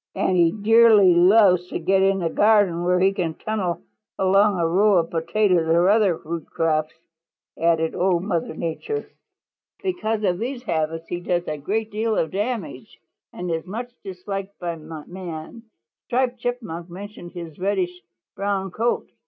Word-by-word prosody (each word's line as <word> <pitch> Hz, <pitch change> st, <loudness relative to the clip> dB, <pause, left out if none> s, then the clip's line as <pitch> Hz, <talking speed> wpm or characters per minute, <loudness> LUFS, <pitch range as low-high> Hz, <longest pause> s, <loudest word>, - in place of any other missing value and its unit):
"And 185 Hz, -, +1 dB
he 170 Hz, -2 st, +4 dB
dearly 215 Hz, -2 st, +5 dB
loves 180 Hz, 0 st, +5 dB
to -, -, -4 dB
get 190 Hz, +3 st, +2 dB
in 195 Hz, -1 st, +2 dB
a 165 Hz, -, +1 dB
garden 205 Hz, -5 st, +3 dB
where 180 Hz, +1 st, +2 dB
he 190 Hz, +1 st, +3 dB
can 170 Hz, -5 st, -2 dB
tunnel 200 Hz, -6 st, -3 dB, 0.3 s
along 195 Hz, +1 st, +3 dB
a 170 Hz, -, +1 dB
row 200 Hz, +5 st, +3 dB
of 165 Hz, -1 st, 0 dB
potatoes 175 Hz, +1 st, +1 dB
or 170 Hz, +3 st, +4 dB
other 205 Hz, -5 st, +3 dB
root 165 Hz, 0 st, -6 dB
crops," 155 Hz, -1 st, -1 dB, 0.6 s
added 165 Hz, -1 st, +1 dB
Old 180 Hz, -1 st, +1 dB
Mother 170 Hz, -5 st, -2 dB
Nature. 170 Hz, -, -4 dB, 0.8 s
"Because 225 Hz, -, -2 dB
of 180 Hz, -3 st, +1 dB
these 245 Hz, +2 st, -4 dB
habits 165 Hz, -4 st, -2 dB
he 175 Hz, -, -3 dB
does 175 Hz, 0 st, -1 dB
a 155 Hz, -, -2 dB
great 215 Hz, +9 st, -3 dB
deal 220 Hz, +1 st, -1 dB
of 160 Hz, -, 0 dB
damage 200 Hz, -, -4 dB, 0.3 s
and 180 Hz, -1 st, -5 dB
is 165 Hz, +2 st, -3 dB
much 240 Hz, +5 st, -6 dB
disliked 195 Hz, +1 st, -6 dB
by 170 Hz, -2 st, -4 dB
man. 165 Hz, +6 st, -9 dB, 0.4 s
Striped 250 Hz, 0 st, 0 dB
Chipmunk 225 Hz, -9 st, -4 dB
mentioned 185 Hz, -1 st, -9 dB
his 170 Hz, -3 st, -9 dB
reddish 185 Hz, -2 st, -1 dB, 0.3 s
brown 195 Hz, -1 st, -2 dB
coat. 230 Hz, +5 st, -1 dB
185 Hz, 155 wpm, -23 LUFS, 170-210 Hz, 0.8 s, dearly